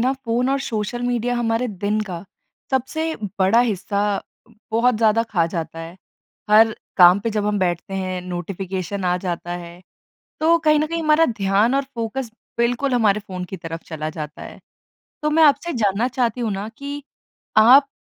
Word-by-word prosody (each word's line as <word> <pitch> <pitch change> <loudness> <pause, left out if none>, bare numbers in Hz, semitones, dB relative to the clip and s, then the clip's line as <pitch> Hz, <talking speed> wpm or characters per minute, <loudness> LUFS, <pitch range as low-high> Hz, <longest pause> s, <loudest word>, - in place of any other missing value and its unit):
ना 255 +3 +2
फ़ोन 250 -2 -1
और 275 - +1
social 225 0 -3
media 245 0 0
हमारे 230 +1 0
दिन 205 +2 -1
का 175 -2 -4 0.5
सबसे 315 +5 -1 0.2
बड़ा 195 +5 +4
हिस्सा 200 -3 -1 0.7
बहुत 235 +3 +3
ज़्यादा 220 0 +3
खा 170 -5 +2
जाता 165 -1 -5
है। 165 +2 -9 0.5
हर 220 +1 +6 0.2
काम 180 +1 +7
पे 230 - -2
जब 210 -1 -1
हम 210 -1 0
बैठते 185 +1 -1
हैं, 185 -1 -3
नोटिफिकेशन 185 +1 -4
आ 180 0 +2
जाता 175 -1 -4
है, 175 0 -8 0.6
तो 330 +2 +4
कहीं 305 -2 +3
न 305 - +1
कहीं 335 +1 -3
हमारा 310 +1 +4
ध्यान 210 +2 +1
और 275 - +2
फ़ोकस 235 +1 -4 0.3
बिल्कुल 245 +3 +1
हमारे 210 -4 +3
फ़ोन 185 -3 -6
की 190 - -7
तरफ 165 -1 -7
चला 155 -1 -4
जाता 150 -2 -7
है। - - -10 0.6
तो 300 - +1
मैं 320 +2 +4
आपसे 315 +3 +4
जानना 215 -1 +1
चाहती 245 -2 -1
हूँ 230 -2 -1
ना 195 +2 -4
कि 285 +1 -6 0.6
आप 260 +6 +7
215 Hz, 175 wpm, -21 LUFS, 185-250 Hz, 0.7 s, काम